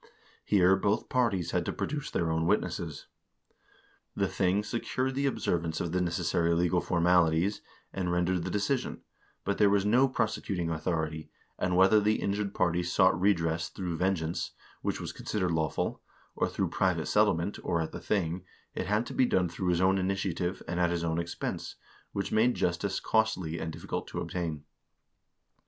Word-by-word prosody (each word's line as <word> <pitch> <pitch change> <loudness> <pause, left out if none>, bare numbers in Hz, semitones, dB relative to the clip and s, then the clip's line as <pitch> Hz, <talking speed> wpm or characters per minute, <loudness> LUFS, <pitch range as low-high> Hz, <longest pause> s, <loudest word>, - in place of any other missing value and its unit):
Here 95 -2 +4
both 100 +2 0
parties 100 -9 +1
had 90 - +1
to - - -1
produce 145 -1 -3
their 85 -1 0
own 80 +1 0
witnesses. 80 -4 -1 1.1
The - - +1
thing 95 +2 +1
secured 130 +4 -2
the 140 +1 0
observ 85 -10 0
ance 80 -1 -3
of 85 - -2
the 90 +1 +1
necessary 85 -1 +1
legal 90 +1 +2
formalities, 85 +1 +2 0.3
and 90 -2 -1
rendered 90 0 +1
the 95 - -3
decision, 105 +8 -1 0.4
but 100 - -1
there 105 -1 +6
was 100 0 +2
no 125 +6 +5
prosecuting 100 -7 -1
authority, 80 -1 -2 0.3
and 90 -1 +1
whether 95 +3 +6
the 105 +1 +2
injured 100 0 -2
party 85 0 +2
sought 90 +1 +3
redress 80 -4 +1
through 90 -4 -4
vengeance, 90 -3 -1 0.3
which - - -2
was - - -5
considered 95 -5 -2
lawful, 80 -2 -1 0.3
or - - 0
through - - -1
private 90 -5 +1
settlement, 100 -3 +2
or 85 - 0
at 80 - -2
the - - -7
thing, 90 -3 -1 0.3
it - - -3
had 105 +4 +1
to - - -7
be 130 - +3
done 90 -5 +2
through 90 +2 -4
his 90 0 +2
own 95 +1 +4
initiative, 95 -1 -1
and 85 +1 -2
at 90 -1 +3
his 85 -1 -1
own 80 0 0
expense, 85 0 -4 0.4
which 100 - -3
made 115 +3 +3
justice 90 +3 0
costly 95 -7 0
and 80 0 -3
difficult - - -5
to - - -5
obtain. 80 -5 -3
90 Hz, 170 wpm, -29 LUFS, 85-100 Hz, 1.1 s, there